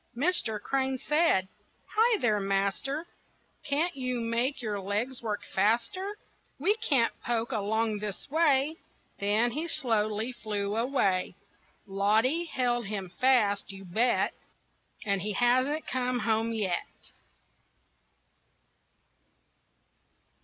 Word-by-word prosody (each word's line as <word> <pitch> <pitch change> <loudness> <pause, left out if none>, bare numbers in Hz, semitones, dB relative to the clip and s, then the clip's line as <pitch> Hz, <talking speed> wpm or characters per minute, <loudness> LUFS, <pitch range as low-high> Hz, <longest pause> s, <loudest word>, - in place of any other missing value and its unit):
Mister 255 -6 +1
Crane 265 +4 -1
said: 300 - +2 0.5
"Hi 450 +1 +4
there, 215 - +1
master, 200 - -1 0.6
Can't 315 +5 0
you 255 -2 -2
make 235 +4 0
your 215 -4 -3
legs 210 +7 -2
work 215 -3 -3
faster? 240 - 0 0.4
We 360 +10 +3
can't 265 - +2
poke 235 +1 -1
along 220 0 0
this 205 -2 -5
way." 300 0 +2 0.4
Then 215 +4 +2
he 310 +7 -2
slowly 225 -6 +1
flew 210 -4 -3
away. 220 -8 +1 0.5
Loddy 215 - +2
held 240 -7 -1
him 195 -3 -4
fast, 210 -3 +2
you 195 0 -10
bet, 225 +8 +1 0.7
And 200 -2 +1
he 210 +2 -2
hasn't 255 +7 +2
come 250 0 -1
home 225 0 +1
yet. 200 -6 -3
235 Hz, 105 wpm, -29 LUFS, 205-270 Hz, 0.7 s, Hi